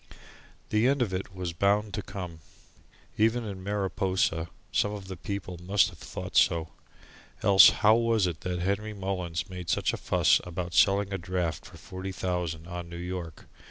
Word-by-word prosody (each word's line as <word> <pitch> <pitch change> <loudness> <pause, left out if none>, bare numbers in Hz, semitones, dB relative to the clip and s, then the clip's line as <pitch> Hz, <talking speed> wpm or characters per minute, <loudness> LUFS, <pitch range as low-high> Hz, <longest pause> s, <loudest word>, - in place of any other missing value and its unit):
The 110 +3 +3
end 140 -1 +3
of 100 -5 -4
it 95 +1 -4
was 90 -2 -4
bound 100 +4 +1
to 110 - -2
come. 90 -5 -7 0.8
Even 115 +2 +3
in 100 -3 -6
Mariposa 95 -4 0 0.2
some 105 - +1
of 100 -2 -7
the 95 - -5
people 90 -1 -5
must 95 +1 +3
have 85 -3 -15
thought - - -7
so. 80 -1 +3 0.7
Else 100 -1 +9 0.2
how 110 +1 +8
was 115 -3 +2
it 85 -3 -3
that 90 -1 -2
Henry 100 +4 -1
Mullins 95 -4 -3
made 90 -3 -7
such - - +1
a - - -2
fuss - - +3
about 90 0 -5
selling 100 +3 +3
a 95 - -2
draft 85 -3 -3
for - - -13
forty 95 +1 -7
thousand 90 -3 -3
on 90 -1 -6
New 85 - -7
York? 90 -3 -6
95 Hz, 175 wpm, -28 LUFS, 90-100 Hz, 0.8 s, Else